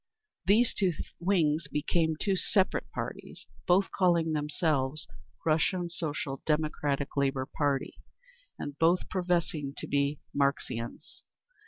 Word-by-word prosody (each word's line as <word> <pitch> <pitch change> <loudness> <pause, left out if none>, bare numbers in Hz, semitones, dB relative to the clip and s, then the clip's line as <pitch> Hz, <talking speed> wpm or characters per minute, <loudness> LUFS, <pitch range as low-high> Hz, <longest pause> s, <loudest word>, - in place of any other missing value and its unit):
These 225 +5 +5
two 190 -3 +1 0.3
wings 165 -5 +2
became 160 +3 +1
two 195 -2 +1
separate 190 +1 +1
parties, - - -6 0.2
both 190 +2 +4
calling 170 -3 +2
themselves 150 -1 0 0.4
"Russian 170 +3 +2
Social 150 -5 -3
Democratic 150 -2 0
Labour 135 -2 +1
Party," 140 -1 -1 0.6
and 145 0 -6
both 170 +3 +3
professing 170 -6 0
to - - -4
be 140 +1 +1 0.2
Marxians. 140 -4 -2
155 Hz, 110 wpm, -30 LUFS, 140-175 Hz, 0.6 s, These